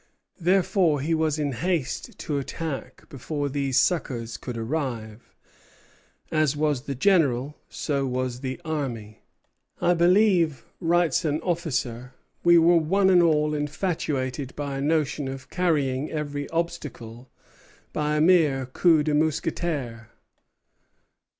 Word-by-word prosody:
Therefore 180 -3 +2
he 155 +5 -1
was 160 -1 +1
in 145 -2 -1
haste 135 +1 -2
to 145 -2 -2
attack 145 +1 -6
before 145 +2 -4
these 135 -2 +1
succors 120 -10 -1
could 125 -2 -6
arrive. 115 -3 -4 1.0
As 155 -3 +1
was 145 -3 0
the 140 - -3
general, 145 -4 +2
so 140 -2 -2
was 125 -1 -2
the 130 +2 -5
army. 125 -9 -4 0.6
"I 175 0 +3
believe," 175 - +3
writes 175 0 +2
an 150 -1 0
officer, 130 -8 -2 0.3
"we 175 0 +6
were 170 +1 +5
one 190 +4 +3
and 180 -1 +6
all 150 -2 +2
infatuated 145 -4 -2
by 140 -2 -4
a - - -3
notion 150 -1 0
of 135 0 -8
carrying 150 -6 0
every 145 -2 -4
obstacle 140 -8 -5 0.6
by 150 0 0
a - - +2
mere 155 -6 +4
coup 155 +4 +3
de 150 0 0
mousqueterie." 150 -6 -1
150 Hz, 125 wpm, -25 LUFS, 130-165 Hz, 1.0 s, we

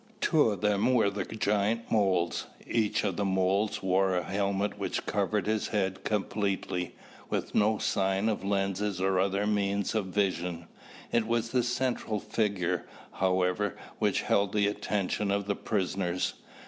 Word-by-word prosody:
Two 155 -8 +4
of 100 -4 -3
them 105 +3 +2
were 105 -4 +3
the 100 - -3
giant 105 +1 0
moles. 95 -5 +1 0.2
Each 110 -3 +1
of 95 -4 -1
the 100 - 0
moles 95 +2 +1
wore 95 0 +2
a 90 - 0
helmet 100 +1 -1
which - - -2
covered - - 0
his 110 0 0
head 95 -2 -1
completely, 100 -3 -1 0.3
with - - -2
no 110 +1 +3
sign 95 -1 +1
of 110 -3 -1
lenses 100 0 0
or 95 0 +2
other 100 +2 +1
means 100 -1 0
of 110 -4 0
vision. 90 -3 -1 0.5
It 115 -2 +2
was 115 0 0
the 125 - +3
central 120 -3 -1
figure, 100 -5 -1 0.2
however, 95 +2 +1 0.2
which - - +1
held 100 0 +2
the 105 -1 +3
attention 105 0 -1
of 100 0 0
the 100 0 0
prisoners. 95 -4 -1
100 Hz, 150 wpm, -29 LUFS, 95-105 Hz, 0.5 s, Two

